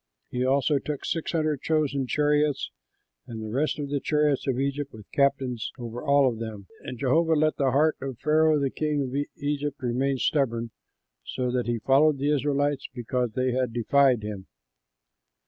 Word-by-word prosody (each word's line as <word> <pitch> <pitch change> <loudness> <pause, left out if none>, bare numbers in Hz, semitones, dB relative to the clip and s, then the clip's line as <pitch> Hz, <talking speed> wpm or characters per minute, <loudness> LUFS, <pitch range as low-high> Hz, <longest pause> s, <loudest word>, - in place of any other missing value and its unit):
He 125 0 -1
also 140 +2 +2
took 145 0 -5
six 165 -2 -2
hundred 155 -4 0
chosen 145 -4 0
chariots 150 +1 +1 0.6
and 115 - -7
the 110 -1 -6
rest 140 +6 0
of 145 -2 -4
the 145 - 0
chariots 150 -2 +1
of 130 -1 0
Egypt 140 +1 -2
with 110 -2 -12
captains 135 -4 0
over 120 -1 -6
all 140 -2 +4
of 115 -3 -2
them; 110 -3 -6 0.2
and 125 - -7
Jehovah 160 +6 +2
let 155 0 +2
the 135 -2 +2
heart 150 +4 +2
of 135 -3 -5
Pharaoh, 155 +2 +3
king 150 -2 -1
of 130 0 -5 0.2
Egypt, 145 0 -2
remain 130 +2 0
stubborn, 120 -5 0 0.5
so 125 - -3
that 125 -1 -1
he 120 0 0
followed 140 +6 +3
the 145 +2 +1
Israelites, 145 0 0
because 125 -1 -2
they 130 0 +1
had 125 -2 -1
defied 125 0 +3
him. 105 -3 -6
140 Hz, 170 wpm, -26 LUFS, 125-150 Hz, 0.6 s, all